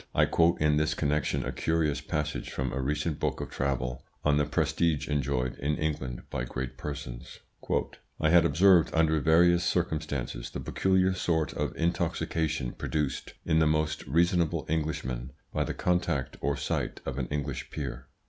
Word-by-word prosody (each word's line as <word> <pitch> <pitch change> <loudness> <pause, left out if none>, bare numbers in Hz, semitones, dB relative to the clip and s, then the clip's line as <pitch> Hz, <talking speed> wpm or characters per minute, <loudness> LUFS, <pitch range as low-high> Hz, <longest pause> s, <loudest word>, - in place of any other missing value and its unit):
I - - +5
quote 85 +1 +3
in 75 -1 +3
this 75 +1 +1
connection 75 0 0
a - - -2
curious 80 -3 0
passage 75 0 -3
from 65 -1 -3
a 65 - -1
recent 75 +3 -1
book - - -1
of - - -5
travel, 65 -2 -2 0.2
on 75 -1 +4
the 75 - +3
prestige 80 -1 +1
enjoyed 65 -3 0
in 75 +3 0
England 75 -6 -3
by - - -2
great 65 +1 -4
persons. 65 -4 -7 0.8
"I 80 - +3
had 85 -1 +7
observed, 85 +2 +5
under 80 -1 +3
various 85 +3 +5
circumstances, 70 -8 -1
the - - -6
peculiar 95 0 +2
sort 80 -4 0
of - - -2
intoxication 80 -5 0
produced 75 -3 -3
in 80 - +3
the 80 - +4
most 75 0 0
reasonable 85 +2 +2
Englishmen 65 -5 -2 0.2
by - - +1
the - - -4
contact 90 -7 0
or 70 0 0
sight - - -2
of 70 0 -3
an 65 - -1
English 70 -2 -3
peer. 70 -5 -5
75 Hz, 160 wpm, -29 LUFS, 70-80 Hz, 0.8 s, had